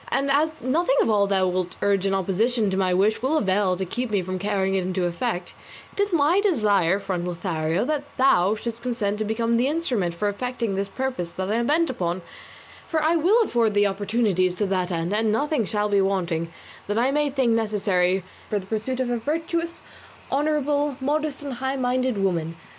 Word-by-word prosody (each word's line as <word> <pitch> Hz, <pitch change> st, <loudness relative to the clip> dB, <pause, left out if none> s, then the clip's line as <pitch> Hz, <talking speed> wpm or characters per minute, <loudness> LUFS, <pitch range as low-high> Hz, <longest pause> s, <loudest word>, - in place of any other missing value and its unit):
And, 275 Hz, 0 st, 0 dB
as 310 Hz, +3 st, +1 dB
nothing 270 Hz, +2 st, +2 dB
of -, -, +1 dB
all 200 Hz, -1 st, +3 dB
thou 190 Hz, -1 st, +2 dB
wilt 180 Hz, -1 st, -1 dB
urge 200 Hz, -1 st, +1 dB
in 195 Hz, -, 0 dB
opposition 205 Hz, +3 st, +1 dB
to -, -, -1 dB
my 190 Hz, -1 st, +1 dB
wish 200 Hz, +5 st, +2 dB
will 275 Hz, +5 st, +1 dB
avail 190 Hz, -4 st, +2 dB
to 190 Hz, +1 st, -3 dB
keep 245 Hz, +7 st, -3 dB
me 200 Hz, -3 st, 0 dB
from 185 Hz, +1 st, -4 dB
carrying 195 Hz, -1 st, 0 dB
it 190 Hz, -, +1 dB
into 185 Hz, 0 st, -1 dB
effect, 175 Hz, +2 st, -3 dB, 0.4 s
it -, -, -12 dB
is 405 Hz, 0 st, 0 dB
my 335 Hz, +4 st, +3 dB
desire, 205 Hz, -, +2 dB
friend 185 Hz, -3 st, -3 dB
Lothario, 170 Hz, +1 st, -1 dB
that 290 Hz, 0 st, -1 dB
thou 210 Hz, -6 st, +4 dB
shouldst 230 Hz, +1 st, -5 dB
consent 225 Hz, -4 st, -2 dB
to 215 Hz, -, -1 dB
become 230 Hz, +2 st, 0 dB
the 245 Hz, +3 st, +2 dB
instrument 250 Hz, -, -1 dB
for 205 Hz, +5 st, -1 dB
effecting 230 Hz, +1 st, -2 dB
this 195 Hz, +1 st, -2 dB
purpose 255 Hz, -7 st, -3 dB
that 190 Hz, +1 st, -2 dB
I 220 Hz, -, +1 dB
am 235 Hz, 0 st, 0 dB
bent 320 Hz, 0 st, +2 dB
upon, 175 Hz, -5 st, -3 dB, 0.6 s
for 320 Hz, -, 0 dB
I 320 Hz, +2 st, +3 dB
will 385 Hz, +9 st, +4 dB
afford 230 Hz, -, +1 dB
thee 205 Hz, 0 st, +4 dB
opportunities 200 Hz, -2 st, +1 dB
to 205 Hz, -, 0 dB
that 185 Hz, -2 st, -1 dB
end, 170 Hz, +1 st, -2 dB
and 215 Hz, 0 st, +1 dB
nothing 285 Hz, +1 st, 0 dB
shall 210 Hz, +1 st, -1 dB
be 200 Hz, -1 st, +3 dB
wanting 175 Hz, -4 st, -1 dB, 0.4 s
that 205 Hz, +1 st, -1 dB
I 250 Hz, +4 st, +2 dB
may 295 Hz, 0 st, +1 dB
think 265 Hz, -4 st, +1 dB
necessary 195 Hz, -4 st, +1 dB, 0.3 s
for 210 Hz, -, 0 dB
the 190 Hz, -, -5 dB
pursuit 220 Hz, +5 st, -2 dB
of 250 Hz, -2 st, -1 dB
a 240 Hz, -, 0 dB
virtuous, 330 Hz, +6 st, -2 dB, 0.5 s
honourable, 290 Hz, -1 st, 0 dB
modest 295 Hz, +1 st, -1 dB
and 280 Hz, -2 st, -4 dB
high 265 Hz, +1 st, -1 dB
minded 255 Hz, -2 st, 0 dB
woman. 170 Hz, -4 st, -1 dB
215 Hz, 205 wpm, -24 LUFS, 190-265 Hz, 0.6 s, thou